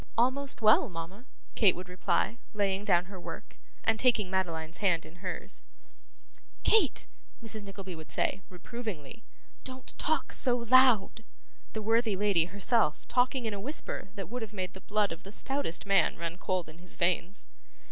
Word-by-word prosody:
'Almost 260 +1 +1
well, 215 0 +6
mama,' 180 +7 -7 0.3
Kate 200 -6 +5
would 180 +1 -7
reply, 185 +5 0 0.2
laying 200 -1 +1
down 180 -4 +3
her 190 0 -9
work, - - -9 0.3
and 225 0 +2
taking 220 -7 +3
Madeline's 165 -3 -2
hand 180 -6 +2
in 170 - -13
hers. 180 0 -6 1.0
'Kate!' 425 - +4 0.4
Mrs. 220 -2 -3
Nickleby 195 -2 -7
would 160 -1 -11
say, 195 - 0
reprovingly, 185 - -7 0.4
'don't 260 0 -6
talk 305 -3 0
so 245 -1 +2
loud' 235 -3 +5 0.5
(the 220 - -3
worthy 225 -1 +2
lady 190 -4 +3
herself 200 -3 +1
talking 250 0 +2
in 220 - -1
a 200 - -4
whisper 255 -3 -5
that 195 - -5
would 245 +2 -5
have 220 -1 -6
made 185 -2 -3
the 190 - -11
blood 210 0 +1
of 165 - -6
the 195 - -10
stoutest 270 -6 -1
man 195 -4 +3
run 170 0 -3
cold 185 -2 -2
in 155 +1 -12
his 180 +1 -16
veins). 180 +2 +1
200 Hz, 165 wpm, -30 LUFS, 180-230 Hz, 1.0 s, well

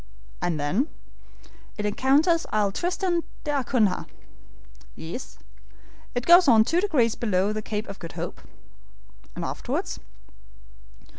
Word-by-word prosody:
"And 170 -3 -1
then?" 180 - +1 0.9
"It 210 - -2
encounters 280 - +3
Isle 210 -2 +2
Tristan 355 - 0 0.2
d'Acunha." 255 -9 +1 0.9
"Yes." - - -7 0.8
"It 245 - -1
goes 350 0 +8
on 225 -4 +7
two 330 +9 +1
degrees 260 - +2
below 205 -2 0
the 215 - -3
Cape 210 0 -4
of 200 - -8
Good 165 - -8
Hope." - - -5 0.9
"And - - -4
afterwards?" - - -3
230 Hz, 115 wpm, -25 LUFS, 205-315 Hz, 0.9 s, goes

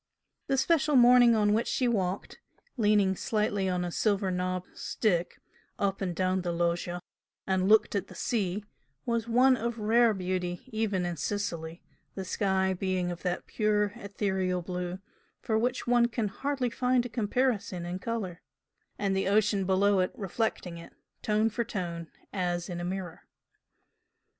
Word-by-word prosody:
The 270 - +1
special 300 +1 +2
morning 245 -1 +7
on 210 -1 +3
which 225 +3 +1
she 255 - +1
walked, 195 -5 -2 0.4
leaning 205 -4 +3
slightly 205 -2 0
on 180 -1 -1
a 175 - -3
silver 200 0 +1
knobbed 180 0 -3
stick, 180 -6 -1 0.4
up 195 -1 -1
and 180 -3 -2
down 185 +1 +1
the 175 -1 -2
loggia 175 +1 -1 0.4
and 190 0 +1
looked 220 0 +5
at 200 -1 -1
the - - -12
sea, 205 -3 -1 0.4
was 235 -1 -1
one 255 +3 +5
of 235 0 -3
rare 225 +1 +3
beauty 180 -1 -3
even 210 -5 0
in 175 -1 -3
Sicily, 170 -3 -3 0.3
the 190 - -4
sky 190 0 +1
being 185 -1 -1
of 175 - -7
that 180 -1 -2
pure 210 -2 +1
ethereal 190 -3 -2
blue 180 0 -4 0.4
for 220 - -1
which 245 +2 -1
one 240 -1 +4
can 230 -3 -2
hardly 270 +1 -2
find 250 0 +1
a - - -1
comparison 220 -5 -1
in 180 +1 -4
colour, 190 -5 -4 0.6
and 200 -2 0
the 190 - 0
ocean 205 -1 +2
below 195 0 +3
reflecting 195 -5 -3
it, 170 - -12 0.3
tone 215 +1 +2
for 230 +2 -1
tone, 170 -7 -5 0.2
as 175 -2 -1
in 175 -1 -4
a - - -4
mirror. 180 -1 -5
195 Hz, 155 wpm, -29 LUFS, 180-225 Hz, 0.6 s, morning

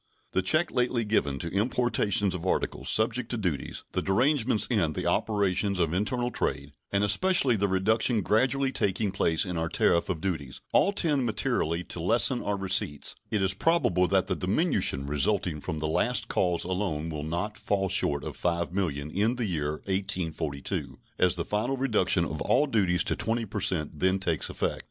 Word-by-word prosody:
The 95 - +1
check 155 - +2
lately 125 -2 0
given 70 -10 0
to 85 +4 -5
importations 105 -2 +1
of 90 -2 -5
articles 95 - -2
subject 115 +2 +1
to 120 - -2
duties, 90 -10 -3
the - - -1
derangements 120 +2 +2
in 90 -11 0
the - - -4
operations 100 -2 +1
of 85 -2 0
internal 120 +6 -1
trade, 70 -9 -2 0.2
and 100 0 +1
especially 135 - +3
the 100 -1 +1
reduction 105 +4 +1
gradually 130 +6 +2
taking 100 -3 0
place 80 -2 +1
in 90 -2 -4
our 80 0 -1
tariff 85 +2 +2
of 90 -4 -2
duties, 80 -7 -4
all 200 - +4
tend 150 -10 +1
materially 105 -7 -1
to 90 - -6
lessen 120 +8 +2
our 100 0 -2
receipts; 95 -7 -1 0.2
indeed, 105 -2 0
it - - +3
is 95 - +2
probable 95 - +2
that 95 -1 +2
the 95 -1 -2
diminution 95 - +1
resulting 75 +2 +1
from 80 - -3
the 75 - -3
last 120 +11 0
cause 90 -2 0
alone 90 -4 -2
will 75 -1 -5
not 85 +7 -3
fall 100 -2 -1
short 90 -7 0
of - - -6
$5,000,000 85 -4 -2
in 110 +6 +1
the 125 -2 -2
year 75 -6 -2
1842, 85 -7 -2 0.2
as 90 -1 +4
the 85 - -3
final 110 +6 -1
reduction 105 -9 +2
of 75 0 -5
all 150 - +3
duties 95 - +1
to - - -1
20 115 +1 -1
per 105 +1 -5
cent 80 -5 0
then 95 +3 +2
takes 85 -6 -1
effect. - - -2
95 Hz, 180 wpm, -27 LUFS, 85-110 Hz, 0.2 s, all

